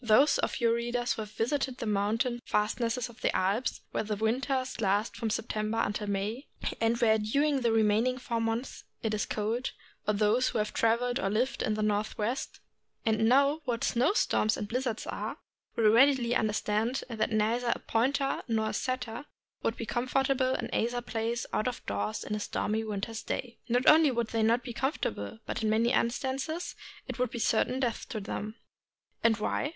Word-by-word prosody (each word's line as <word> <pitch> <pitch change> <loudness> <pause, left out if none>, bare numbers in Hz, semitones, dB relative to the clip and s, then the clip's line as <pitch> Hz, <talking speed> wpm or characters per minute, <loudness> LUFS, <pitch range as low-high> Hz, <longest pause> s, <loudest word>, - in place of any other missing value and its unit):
Those 235 +6 +5
of - - -1
your 230 -1 +3
readers 240 +1 0
who - - -5
have 210 - -6
visited 260 +3 -1
the - - -4
mountain 225 +4 0
fastnesses 230 +3 0
of 240 0 -15
the - - +1
Alps, 200 +7 0
where - - 0
the 210 0 -2
winter 255 +5 0 0.2
lasts 205 +1 0
from 225 - -1
September 215 0 -2
until 210 0 -1
May, 205 +7 -2 0.3
and 230 +1 +2
where 220 -2 +4
during 280 +6 +1
the 235 -2 +2
remaining 225 +3 +3
four 235 -2 -2
months 225 +3 -2 0.2
it 220 -1 0
is 210 - -1
cold, 225 +4 -2 0.3
or 210 - +2
those 215 +5 +3
who - - -2
have 210 0 -1
traveled 245 +3 +2
or 195 - 0
lived 235 +6 0
in 215 - 0
the 215 - -1
Northwest, 215 +4 -1 0.4
and 220 0 +3
know 280 +4 +4
what 240 -3 -1
snow 255 +9 +2
storms 215 - +2
and 210 - -4
blizzards 240 0 -2
are, - - -4 0.4
will 215 -2 +5
readily 250 -1 +5
understand 220 +2 0
that 225 -3 -1
neither 230 +3 +1
a - - -5
Pointer 270 +4 0
nor 220 -2 +1
a - - -4
Setter 255 0 -3 0.4
would 225 - -1
be 230 - -4
comfortable 260 +2 +1
in 230 - -4
either 240 +1 0
place, 230 0 -2
out 215 - +1
of 250 - -4
doors, 100 +1 -2
in - - -4
a 210 - -1
stormy 215 +1 -1
winter's 215 +1 -4
day. 240 -2 -4
Not 245 +2 +2
only 310 -1 +8
would 235 -3 -1
they 225 - 0
not 230 +2 +3
be 245 - -6
comfortable, 220 - -2
but - - -3
in 220 - +1
many 225 +2 +3
instances 270 +7 -1 0.3
it - - -6
would 250 -1 +1
be 240 - -6
certain 235 +3 +1
death 245 -4 -2
to 225 - -3
them. 210 +1 -5 0.7
And 230 -2 +4
why? 215 +7 -1
230 Hz, 190 wpm, -30 LUFS, 215-250 Hz, 0.7 s, only